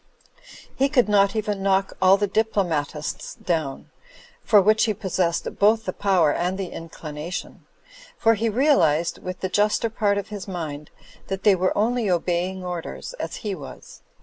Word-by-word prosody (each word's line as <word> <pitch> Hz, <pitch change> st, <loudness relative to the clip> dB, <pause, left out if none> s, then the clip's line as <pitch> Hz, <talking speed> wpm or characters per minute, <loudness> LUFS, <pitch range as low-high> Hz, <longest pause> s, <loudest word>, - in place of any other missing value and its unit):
He 275 Hz, +1 st, +2 dB
could 255 Hz, -5 st, +3 dB
not 200 Hz, -1 st, +3 dB
even 210 Hz, -2 st, -2 dB
knock 195 Hz, 0 st, +1 dB
all 190 Hz, +1 st, +6 dB
the 205 Hz, -, +1 dB
diplomatists 180 Hz, -8 st, -2 dB
down 155 Hz, -6 st, -3 dB, 0.5 s
(for 210 Hz, -, +6 dB
which 215 Hz, +3 st, +4 dB
he 215 Hz, -2 st, 0 dB
possessed 185 Hz, -4 st, -2 dB
both 220 Hz, +2 st, +4 dB
the 185 Hz, -, -2 dB
power 180 Hz, -7 st, +2 dB
and 180 Hz, +2 st, -1 dB
the 190 Hz, -3 st, -4 dB
inclination), 165 Hz, 0 st, -7 dB, 0.5 s
for 225 Hz, 0 st, +4 dB
he 225 Hz, +1 st, 0 dB
realised, 180 Hz, -, +2 dB
with 185 Hz, 0 st, -6 dB
the 190 Hz, -, 0 dB
juster 210 Hz, +3 st, +1 dB
part 205 Hz, -2 st, +1 dB
of 200 Hz, -, -4 dB
his 205 Hz, -2 st, -7 dB
mind, 155 Hz, -5 st, -5 dB, 0.4 s
that 195 Hz, 0 st, -4 dB
they 210 Hz, -, +6 dB
were 185 Hz, +1 st, 0 dB
only 230 Hz, 0 st, +1 dB
obeying 180 Hz, +1 st, -1 dB
orders,, 180 Hz, -, -6 dB
as -, -, -4 dB
he 205 Hz, -, -1 dB
was. 145 Hz, -7 st, -10 dB
195 Hz, 160 wpm, -23 LUFS, 175-210 Hz, 0.5 s, all